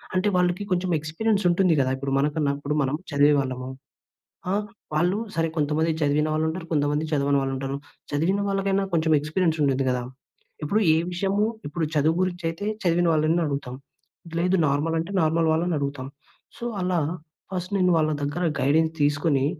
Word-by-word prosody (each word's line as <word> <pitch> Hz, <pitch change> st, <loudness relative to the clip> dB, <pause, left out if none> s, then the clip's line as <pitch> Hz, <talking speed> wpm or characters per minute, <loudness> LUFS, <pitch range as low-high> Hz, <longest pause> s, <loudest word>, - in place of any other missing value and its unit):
అంటే 185 Hz, +3 st, +2 dB
వాళ్ళకి 180 Hz, +2 st, +1 dB
కొంచుం 180 Hz, 0 st, 0 dB
ఎక్స్పీరియన్సుంటుంది 180 Hz, +2 st, +1 dB
గదా! 130 Hz, -1 st, +2 dB
ఇప్పుడు 135 Hz, +1 st, -4 dB
మనకున్నప్పుడు 145 Hz, 0 st, 0 dB
మనం 135 Hz, +1 st, 0 dB, 0.2 s
చదివేవాళ్ళము. 140 Hz, -3 st, +2 dB, 0.8 s
ఆహ్, 205 Hz, +2 st, +1 dB, 0.3 s
వాళ్ళూ 175 Hz, +6 st, +2 dB, 0.2 s
సరే, 165 Hz, 0 st, +1 dB
కొంతమంది 155 Hz, +2 st, +1 dB
చదివిన 150 Hz, +1 st, +2 dB
వాళ్ళుంటారు, 160 Hz, +3 st, -1 dB
కొంతమంది 150 Hz, 0 st, +1 dB
చదవని 140 Hz, -1 st, +2 dB
వాళ్ళుంటారు. 135 Hz, 0 st, -3 dB, 0.3 s
చదివిన 170 Hz, +8 st, +1 dB
వాళ్ళకైనా 195 Hz, 0 st, +1 dB
కొంచెం 160 Hz, -1 st, +2 dB
ఎక్స్‌పీరియన్సుండిద్ది 150 Hz, -4 st, +1 dB
గదా! 125 Hz, -1 st, -1 dB, 0.6 s
ఇప్పుడు 205 Hz, +9 st, +1 dB
ఏ -, -, +3 dB
విషయము, 195 Hz, +3 st, +1 dB, 0.2 s
ఇప్పుడు 165 Hz, +2 st, -2 dB
చదువు 155 Hz, +3 st, +2 dB
గురించయితే, 175 Hz, 0 st, -2 dB, 0.2 s
చదివిన 175 Hz, -1 st, +2 dB
వాళ్ళని 155 Hz, +2 st, +2 dB
అడుగుతాం. 140 Hz, -3 st, -4 dB, 0.6 s
లేదు 180 Hz, +2 st, +2 dB
నార్మలంటే, 160 Hz, +5 st, 0 dB
నార్మల్ 165 Hz, +1 st, +2 dB
వాళ్ళనడుగుతాం. 145 Hz, -5 st, -1 dB, 0.5 s
సో, -, -, -10 dB, 0.2 s
అలా 180 Hz, -1 st, +1 dB, 0.5 s
ఫస్ట్ 185 Hz, +1 st, -4 dB
నేను 180 Hz, -1 st, +3 dB
వాళ్ళ 155 Hz, -1 st, +2 dB
దగ్గర 145 Hz, +5 st, -2 dB, 0.2 s
గైడెన్స్ 160 Hz, +4 st, +2 dB
తీసుకొని, 145 Hz, -1 st, +2 dB
160 Hz, 135 wpm, -25 LUFS, 145-180 Hz, 0.8 s, ఏ